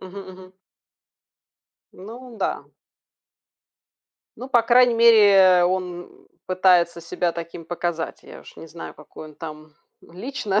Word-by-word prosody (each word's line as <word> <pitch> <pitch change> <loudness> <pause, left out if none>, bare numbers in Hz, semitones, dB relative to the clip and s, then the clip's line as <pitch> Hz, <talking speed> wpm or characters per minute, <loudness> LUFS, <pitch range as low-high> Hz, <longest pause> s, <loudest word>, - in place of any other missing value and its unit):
Мгм, 190 +1 -10
мгм. 185 0 -15 1.4
Ну 235 +5 -12
да. 195 - -4 1.7
Ну, 255 - -9
по 240 -3 +3
крайней 245 0 +4
мере, 230 -3 +6
э, 185 -2 +5
он, 180 -1 -2
м, 390 0 -22 0.2
пытается 180 -2 +2
себя 170 +1 -3
таким 170 0 -8
показать. 170 -1 -4
Я - - -13
уж - - -16
не - - -11
знаю, 165 +1 -10
какой 155 0 -13
он 155 - -16
там 155 -1 -10 0.3
лично, 210 +2 -4
185 Hz, 130 wpm, -22 LUFS, 170-230 Hz, 1.7 s, мере